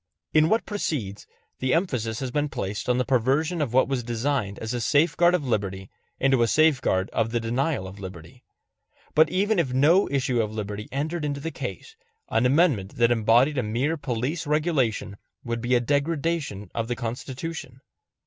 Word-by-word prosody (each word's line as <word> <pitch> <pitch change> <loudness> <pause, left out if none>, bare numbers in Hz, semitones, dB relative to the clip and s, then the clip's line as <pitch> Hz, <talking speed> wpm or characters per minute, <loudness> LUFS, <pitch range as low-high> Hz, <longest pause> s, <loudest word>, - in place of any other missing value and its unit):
In 155 +1 +5
what 220 +1 +2
precedes, 130 - -3 0.3
the 130 +2 +1
emphasis 125 - -1
has 130 -2 -3
been 150 +2 0
placed 100 -1 -4
on 125 - +3
the 125 - +1
perversion 140 +7 +1
of 140 -6 -1
what 130 +2 +4
was 135 -2 -1
designed 120 -3 -2
as 110 +2 -4
a 120 - -2
safeguard 175 +6 +3
of 155 -6 -2
liberty 100 -5 -2 0.3
into 135 -2 +3
a 115 - +4
safeguard 130 -10 +3
of 115 0 0
the 120 +1 0
denial 120 0 -1
of 95 +2 -10
liberty. 90 -4 -10 0.7
But 155 0 +5
even 200 +2 +1
if 135 -7 0
no 160 +9 +4
issue 130 -3 +1
of 105 -1 -2
liberty 105 -1 -5
entered 155 +4 -2
into 145 -1 -2
the 165 +3 -4
case, 445 - -7 0.3
an 115 +3 +2
amendment 135 - +2
that 120 0 +3
embodied 120 +5 +3
a - - +2
mere 125 +8 -1
police 145 +3 -3
regulation 145 - 0 0.3
would 115 -1 -3
be 125 +1 +1
a - - +4
degradation 145 - -1
of 115 -1 -2
the 120 - -2
Constitution. 130 +3 -6
130 Hz, 175 wpm, -25 LUFS, 115-150 Hz, 0.7 s, In